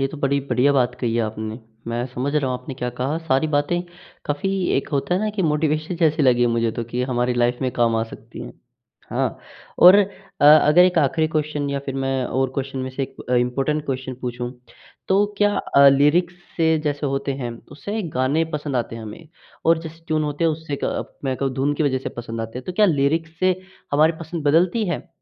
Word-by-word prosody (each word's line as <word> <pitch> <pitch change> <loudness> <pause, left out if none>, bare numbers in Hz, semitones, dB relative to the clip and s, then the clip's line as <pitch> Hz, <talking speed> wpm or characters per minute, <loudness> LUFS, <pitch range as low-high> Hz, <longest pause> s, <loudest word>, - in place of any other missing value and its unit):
ये 135 - +2
तो 155 - -9
बड़ी 140 0 +1
बढ़िया 125 +3 +3
बात 125 -2 +2
कही 115 -2 0
है 120 - +2
आपने। 110 +1 -4 0.3
मैं 120 +1 -2
समझ 130 +3 -3
रहा 140 -4 +1
हूँ 125 - -1
आपने 130 +1 -8
क्या 125 -2 -3
कहा, 135 +5 -1
सारी 155 -2 +1
बातें 145 +4 +1 0.4
काफ़ी 145 +6 -1 0.3
एक 135 - -2
होता 140 +5 0
है 185 - 0
ना 215 0 0
कि 190 - +1
मोटिवेशन 155 +2 0
जैसी 160 -2 +2
लगी 120 -2 +4
मुझे 115 -1 +1
तो 120 - -4
कि 120 +2 -3
हमारी 125 -1 0
लाइफ 120 0 +1
में 130 - 0
काम 115 -1 +2
आ 110 - +1
सकती - - -10
हैं। - - -9 0.6
हाँ, - - -1 0.4
और 180 +2 +9
अ, 200 -1 +3 0.4
अगर 150 +3 +7
एक 180 -2 +2
आखिरी 150 +2 +2
क्वेश्चन 150 -2 -2
या 140 - -1
फिर 135 - -3
मैं 135 -1 -1
और 130 0 0
क्वेश्चन 135 0 -3
में 130 0 -3
से 135 - -1
एक - - -6
अ, - - +3
इंपॉर्टेंट 135 +5 0
क्वेश्चन 130 -1 -3
पूछूँ, 125 0 -4 0.6
तो 200 +2 +4
क्या 205 0 +3
अ, 140 0 +5
लिरिक्स 150 +6 +3 0.2
से 160 -1 +3
जैसे 145 0 -1
होते 135 0 -1
हैं 125 -3 -4 0.2
उससे 200 +7 -7
ना 220 - -1
एक 170 -7 -4
गाने 135 +6 +1
पसंद 145 -3 -2
आते 115 -1 -2
हैं 115 - -8
हमें 110 +9 -10 0.4
और 165 0 +5
जैसे 165 0 -10
ट्यून 155 -1 0
होते 150 +2 -2
हैं 165 - +4
उससे 155 -2 -4
का - - -1 0.2
मैं 130 -1 -1
कहूँ 135 -1 -1
धुन 140 +2 0
की 155 - -1
वजह 130 -3 +1
से - - -5
पसंद 115 -1 -5
आते 115 +2 -5
है। - - -8
तो 185 - -4
क्या 210 +2 +4
लिरिक्स 160 +1 0
से 185 0 +2 0.3
हमारी 155 +3 +4
पसंद 160 -1 -5
बदलती 180 +8 +3
है? 170 - -4
140 Hz, 225 wpm, -22 LUFS, 125-160 Hz, 0.6 s, और